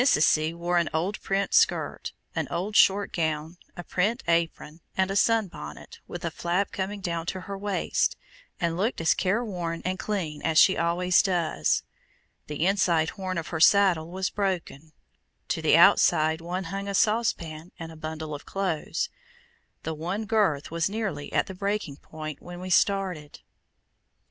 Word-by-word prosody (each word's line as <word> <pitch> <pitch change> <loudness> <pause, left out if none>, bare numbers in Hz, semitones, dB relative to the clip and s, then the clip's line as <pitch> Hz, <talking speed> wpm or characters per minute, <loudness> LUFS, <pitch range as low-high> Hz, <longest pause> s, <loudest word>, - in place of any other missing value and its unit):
C. 155 - +3
wore 175 +1 0
an 170 - 0
old 185 +6 -1
print 195 +1 -1
skirt, - - +2 0.2
an - - -2
old 200 +4 -3
short 200 +1 +4
gown, 160 0 -2 0.2
a 175 - -5
print 210 +9 0
apron, 165 -1 -1 0.2
and 190 0 +2
a - - -2
sun 225 0 +3
bonnet, 75 - -10
with - - -6
a - - -1
flap 180 +3 -1
coming 195 +1 -4
down 170 -2 -3
to 185 - -3
her 200 +2 -6
waist, 200 0 0 0.4
and 170 -3 0
looked 210 +8 -1
as 165 - +3
careworn 185 -5 -1
and 185 +1 -2
clean 170 -8 -3
as 160 -1 0
she 190 +3 +7
always 175 +2 +3
does. 170 - 0 0.6
The 150 +2 -2
inside 175 -5 +2
horn 185 -3 -4
of 165 - -4
her 160 - -3
saddle 175 -2 +5
was 185 +1 -2
broken; 175 -6 -3 0.6
to - - -1
the - - +5
outside 160 +1 +5
one 180 +3 -3
hung 200 0 -4
a 200 - -2
saucepan 180 -8 0
and 165 -2 -7
a - - -11
bundle 155 0 -6
of 145 - -7
clothes. 190 -6 -2 0.8
The 160 - -3
one 180 +8 -3
girth 200 -11 +1
was 165 +1 0
nearly 200 -9 -4
at - - +2
the 190 - -8
breaking 200 -6 -3
point 155 -1 -8
when 175 0 -9
we 185 0 -6
started. 180 -6 +1
175 Hz, 165 wpm, -26 LUFS, 160-195 Hz, 0.8 s, she